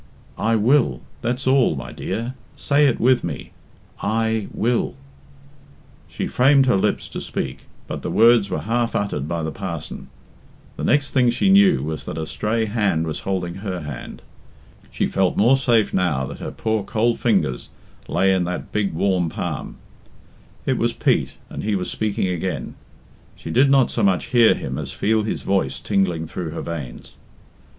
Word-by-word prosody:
"I 115 +1 +2
will! 115 - +3 0.2
That's 125 +3 -2
all, 130 - +3
my 65 -1 -6
dear. 115 +3 -4 0.2
Say 145 0 +3
it 130 - 0
with 125 +1 +3
me, - - -5 0.5
'I 110 0 0
will.'" 120 +2 0 1.1
She - - -4
framed 135 +1 +4
her 125 - +3
lips 95 - 0
to - - -6
speak, - - -5 0.2
but - - -5
the - - -4
words 115 -2 +5
were - - -2
half 115 +1 -1
uttered 75 -9 -1
by 85 0 -2
the 80 - -2
parson. 85 -5 -6 0.7
The - - -6
next 140 +1 +2
thing 125 -3 +3
she 190 +11 +2
knew 195 -2 +5
was 80 0 -4
that - - -5
a 80 - -2
stray 110 +7 -1
hand 100 -7 0
was 80 -2 -3
holding 90 -2 -3
her 95 -4 -4
hand. 75 -5 -8 0.7
She - - -1
felt 95 -2 0
more 120 +6 +5
safe 120 -5 +2
now 75 -8 +1
that 70 - -8
her - - -5
poor 110 -2 -1
cold 115 +3 0
fingers 90 - 0 0.4
lay 95 0 +2
in 95 -1 +1
that 90 +1 -5
big 105 -4 0
warm 90 -1 +1
palm. 80 -5 -5 0.9
It - - 0
was - - +1
Pete, - - +1
and - - -6
he 105 0 0
was 90 -2 -2
speaking 105 -3 -1
again. 90 0 -3 0.6
She - - -7
did 135 +3 +4
not 135 -2 +4
so 115 - -1
much 95 0 +1
hear 120 -2 +6
him - - -4
as - - -5
feel 110 +1 +1
his 105 - -3
voice 70 -9 0
tingling 95 -5 0
through 80 +1 -5
her 80 - -5
veins. 75 -8 -7
100 Hz, 175 wpm, -22 LUFS, 85-120 Hz, 1.1 s, hear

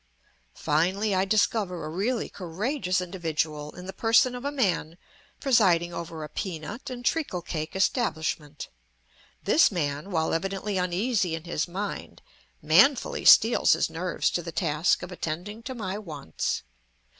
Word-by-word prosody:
Finally 185 +7 +1
I 190 0 +2
discover 195 -4 +1
a - - -5
really 215 +9 -1
courageous 185 - -2
individual, 160 -4 -3
in 180 - -9
the 190 - -6
person 230 +2 +3
of 250 0 -6
a 285 - -1
man 185 - 0 0.4
presiding 185 -10 +3
over 165 -2 -6
a - - -5
peanut 190 - -6
and 245 -1 -7
treacle 280 - -1
cake 155 -1 -5
establishment; 160 - -1 0.7
this 300 +8 +5
man, 150 -1 -2
while 160 -4 0
evidently 195 +3 -2
uneasy 180 0 0
in 165 - -7
his 170 -2 -2
mind, 195 +4 -6 0.4
manfully 240 - +4
steels 225 +2 +7
his - - 0
nerves 180 +2 -1
to 175 - -1
the 170 0 -7
task 160 0 +1
of 180 - -7
attending 180 +6 -5
to 255 +2 -6
my 205 -3 -4
wants. 150 - -4
180 Hz, 145 wpm, -27 LUFS, 160-215 Hz, 0.7 s, steels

